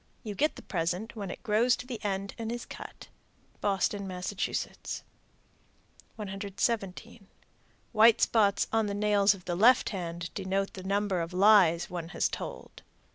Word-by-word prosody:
You 215 -3 -5
get 300 +10 +1
the - - -11
present 180 +6 -2
when 200 -4 -5
it - - -8
grows 235 +2 +3
to - - -9
the 240 -4 -7
end 195 -1 -2
and 225 0 -3
is 240 0 -5
cut. - - -10 0.5
Boston, 200 0 0
Mass. 180 0 -4 1.8
117. 200 +1 -3 0.6
White 225 0 +6
spots 205 -3 +3
on 225 -1 +2
the 200 - -3
nails 205 -1 +3
of 180 - -15
the 175 - -2
left 240 +8 +5
hand 170 -3 -5
denote 195 0 -2
the 190 - -8
number 195 -1 0
of 165 +2 -5
lies 185 -4 +5
one 170 -2 -5
has - - +2
told. - - -7
200 Hz, 150 wpm, -29 LUFS, 185-220 Hz, 1.8 s, White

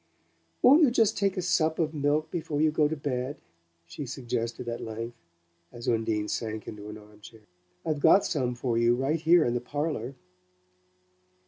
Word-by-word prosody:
"Won't 285 +6 +7
you 295 - +6
take 240 - -7
just 220 -2 +2
a 195 -2 +1
sup 160 -2 +1
of 160 -1 0
milk 150 +1 0
before 155 -3 -3
you 155 0 +3
go 150 -1 +3
to 160 - -3
bed?" 135 -1 -3 0.5
she 125 - -7
suggested 120 -1 -4
at 120 0 -4
length, 115 +1 -6 0.6
as 120 +1 -9
Undine 110 -3 0
sank 110 -1 -4
into 105 0 -8
an 105 - -8
armchair. 105 +1 -15 0.4
"I've 155 -2 -1
got 195 +7 +5
some 125 -7 -1
for 120 -1 -1
you 120 +1 +4
right 135 +6 0
here 170 0 +5
in 120 - 0
the 120 - -1
parlour." 145 -1 -3
130 Hz, 175 wpm, -28 LUFS, 115-155 Hz, 0.6 s, Won't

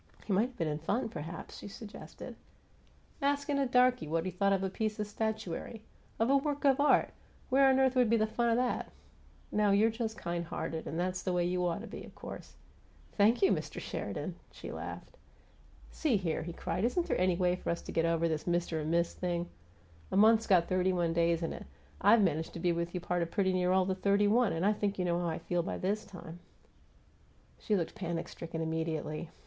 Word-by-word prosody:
"He 205 - -1
might 210 +6 +3
have 255 - -17
been 165 - 0
in 150 0 -2
fun, 205 +10 -1
perhaps," 165 -1 -7
she - - -8
suggested. 205 +1 -9 0.9
"Askin' 285 0 +1
a 275 - +2
darky 250 -6 +3
what 165 +2 -1
he 185 - -2
thought 200 +3 +1
of 195 -1 +1
a 190 - 0
piece 215 +1 -2
of 210 - 0
statuary 220 0 -4 0.3
of 225 - +2
a 280 - +6
work 290 +1 -2
of 275 0 +5
art! 290 - +4 0.4
Where 270 +1 +5
on 265 - +4
earth 265 -1 +4
would 250 -3 +4
be 230 - +4
the 215 - +3
fun 235 +2 0
of 230 - +3
that? 250 0 -1 0.6
No, 210 -1 +2
you're 210 +3 +4
just 225 -1 -3
kind 170 0 -3
hearted 160 0 -4
and 165 - -3
that's 185 +1 -1
the 185 - -1
way 175 -1 +2
you 180 0 0
OUGHT 175 +2 -1
to 230 - -8
be, - - -8
of - - -13
course - - -9 0.3
" - - -29
"Thank 220 - +4
you, 390 - +6
Mr. - - -2
Sheridan!" - - -4
she - - -9
laughed. - - -7 0.7
"See 280 -9 +1
here!" 170 -5 -1
he 170 - -5
cried. 180 - -3
"Isn't 335 +9 +1
there - - 0
any 185 -1 +3
way 180 0 +2
for - - -5
us 170 - -2
to - - -7
get 165 - +1
over 165 0 +2
this 155 0 -2
Mister 175 -2 0
and 155 0 -3
Miss 170 +1 +1
thing? 175 -1 -2 0.6
A - - +1
month's 220 +2 +5
got 175 -3 +4
thirty 185 0 +2
one 170 -2 +1
days 170 0 +2
in 165 - -2
it; - - -9 0.3
I've 230 -2 +6
managed 160 -3 0
to - - -6
be 175 +1 +2
with 170 +1 -2
you - - 0
a - - -15
part 175 0 0
of 170 - -1
pretty 190 +1 +1
near 180 0 +2
all 190 0 +4
the 190 - 0
thirty 200 +2 +2
one, 230 +2 +3
and 165 +3 -1
I 210 - +4
think 205 -1 -2
you 180 - 0
know 175 0 +1
how 175 - -1
I 160 - -1
feel 175 -1 -1
by - - -4
this 205 +3 -1
time 175 -2 -10 0.6
" - - -32
She 215 - 0
looked 170 -4 -1
panic 170 -5 -3
stricken 165 -1 -6
immediately. 160 0 -3
185 Hz, 230 wpm, -32 LUFS, 170-220 Hz, 0.9 s, a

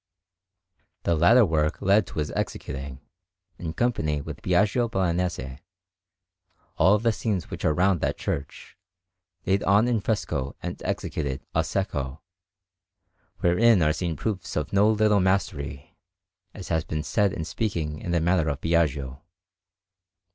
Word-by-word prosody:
The 85 - +2
latter 110 +10 +6
work 80 -2 0
led 100 0 +3
to - - -10
his 75 -1 -1
executing, 65 0 -5 0.6
in 80 -2 -4
company 80 -10 0
with 70 - -8
Biagio 115 +3 +2
Bolognese, 85 - -1 1.2
all 95 +5 +5
the 115 +2 +1
scenes 105 -5 -3
which - - -6
are 80 - +3
round 90 -2 +2
that - - -1
church, 70 0 -5 0.7
laid 95 +1 +2
on 100 +4 +4
in 120 -2 +1
fresco 95 - -2
and - - -5
executed 70 -4 -3
"a - - +1
secco," 75 -5 -2 1.2
wherein 95 +2 +4
are 75 0 +3
seen 85 -1 -2
proofs 95 +3 -4
of 75 +4 -2
no 100 +2 +5
little 105 -1 +3
mastery, 80 -7 -1 0.6
as 95 - -8
has 80 -1 +1
been 75 -1 -3
said 100 +4 +1
in 80 - -4
speaking 80 -7 -3
of 85 - -3
the 85 - +2
manner 85 -2 +2
of 70 -1 -3
Biagio. 70 -5 0
85 Hz, 140 wpm, -25 LUFS, 75-100 Hz, 1.2 s, latter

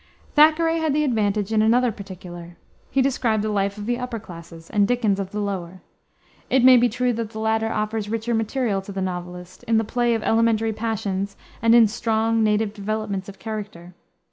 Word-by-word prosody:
Thackeray 320 +2 +4
had 315 -3 0
the 300 - +2
advantage 215 -5 0
in 215 - +3
another 240 +2 +3
particular: 175 -4 -10 0.3
he 270 - +2
described 235 -5 0
the 215 - -1
life 200 0 -1
of 205 - -6
the 240 +2 -1
upper 250 -2 -4
classes, 165 -4 -12
and 205 -2 +3
Dickens 220 -5 +1
of 195 -1 -3
the 210 - -5
lower. 185 -3 -4 0.7
It 260 -2 +3
may 255 0 +9
be 245 0 +4
true 250 +2 0
that 230 -1 -3
the 220 0 -8
latter 220 0 0
offers 215 -1 -2
richer 225 +2 -2
material 225 -2 0
to 195 - -9
the 195 - -5
novelist, 180 -1 -6
in 225 -1 +2
the 225 - +2
play 240 +2 0
of 220 - -3
elementary 225 -1 +2
passions 200 -3 -3 0.3
and 230 +1 +5
in 230 -2 +7
strong, 225 0 0
native 210 0 +1
developments 205 -2 -3
of 195 - -11
character. 205 -5 -7
220 Hz, 195 wpm, -23 LUFS, 200-230 Hz, 0.7 s, may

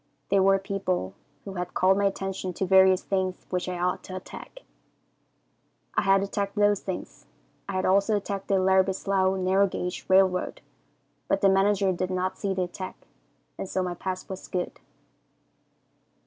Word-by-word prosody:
They 200 - +4
were 195 0 +5
people 190 - -2 0.3
who 195 - -6
had 180 -1 -5
called 190 +1 +4
my 200 +1 +1
attention 195 -1 -2
to 190 - -2
various 190 0 +5
things 185 -1 -2
which 180 0 -1
I 180 - -3
ought 180 +1 -1
to 185 - -7
attack. 345 - -10 1.3
I - - +2
had 195 0 +3
attacked 200 0 -3
those 205 -1 +3
things. 190 - -7 0.4
I - - -3
had 185 0 0
also 200 +3 +3
attacked 200 -1 -4
the 195 - +2
Larrabie 190 0 +3
Slough 190 -1 +1
Narrow 190 +2 +3
Gauge 180 -1 -4
Railroad, 185 -1 +2 0.7
but 195 - +1
the 195 - +5
manager 195 0 +3
did 185 0 -2
not 185 0 -1
see 200 - -1
the 185 - 0
attack, 185 +1 -7 0.5
and 190 - -4
so 185 - 0
my 180 -1 -2
pass 185 +1 -5
was 190 -1 -7
good. 180 -1 -4
190 Hz, 165 wpm, -26 LUFS, 185-195 Hz, 1.3 s, were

